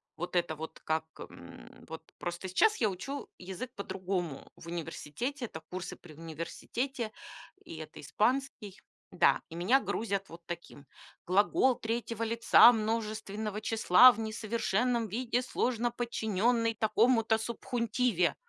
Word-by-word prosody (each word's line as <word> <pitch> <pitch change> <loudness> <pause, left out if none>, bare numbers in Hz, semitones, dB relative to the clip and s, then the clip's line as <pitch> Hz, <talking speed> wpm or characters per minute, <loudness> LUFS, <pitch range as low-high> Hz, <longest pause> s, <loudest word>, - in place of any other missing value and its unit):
вот 175 +2 -5
это 170 -2 +1
вот 160 +1 -8
как, 160 0 0
м, - - -12
вот 160 0 -10
просто 175 +2 -5
сейчас 425 - +3
я 215 -4 +2
учу 275 +10 -6
язык 190 +7 -7
по-другому 185 -6 -4
в 170 - -13
университете. 230 - -4
Это 160 - -8
курсы 185 0 -5
при 160 -3 -15
университете, 215 - -4 0.5
и 160 - -9
это 155 - -9
испанский 215 - -1 0.3
да, - - +4
и - - -11
меня 215 +11 +3
грузят 200 -2 -2
вот 170 +1 -11
таким: 170 -4 -8 0.4
глагол 210 +7 +3
3 230 0 -3
лица 230 +1 +7
множественного 215 -1 -3
числа 225 +2 +7
в 225 - -8
несовершенном 225 +1 0
виде, 245 +4 -1
сложно 240 -1 0
подчиненный 230 -1 0
такому-то 220 +1 +3
субхунтиве. 230 -4 0
215 Hz, 125 wpm, -31 LUFS, 180-235 Hz, 0.5 s, лица